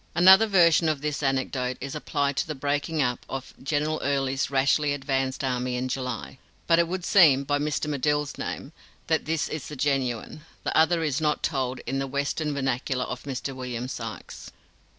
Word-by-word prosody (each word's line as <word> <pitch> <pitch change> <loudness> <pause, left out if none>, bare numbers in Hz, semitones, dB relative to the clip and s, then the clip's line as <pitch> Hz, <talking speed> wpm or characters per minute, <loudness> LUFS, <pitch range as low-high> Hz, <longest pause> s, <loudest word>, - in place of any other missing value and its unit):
Another 190 +5 +8
version 170 -4 +5
of 150 -3 -1
this 150 -1 -2
anecdote 130 -2 -1
is 135 +1 -5
applied 145 -2 -1
to - - 0
the 155 - -4
breaking 145 +3 -1
up 125 -1 -2
of 135 -1 -6
General 150 +3 -1
Early's 135 -1 0
rashly 140 +2 +2
advanced 135 -1 -2
army 125 -1 -1
in 125 +1 -2
July; 125 0 -4 0.3
but 165 0 +4
it 170 - +3
would 180 +1 -4
seem, 155 -10 +6
by 145 +1 0
Mr. 150 +1 -1
Medill's 145 0 0
name, 140 - -5 0.3
that 160 -1 0
this 160 -1 0
is 155 -3 -5
the 150 - -7
genuine; 135 0 -1 0.2
the - - -2
other 165 +1 +4
is 150 -1 0
not 150 -1 0
told 130 -4 -1
in 135 +3 -3
the 135 - -2
Western 140 +3 -1
vernacular 130 -2 -1
of - - -6
Mr. 135 0 -4
William 125 -1 -4
Sykes.) 115 -4 -7
140 Hz, 180 wpm, -26 LUFS, 130-150 Hz, 0.3 s, Another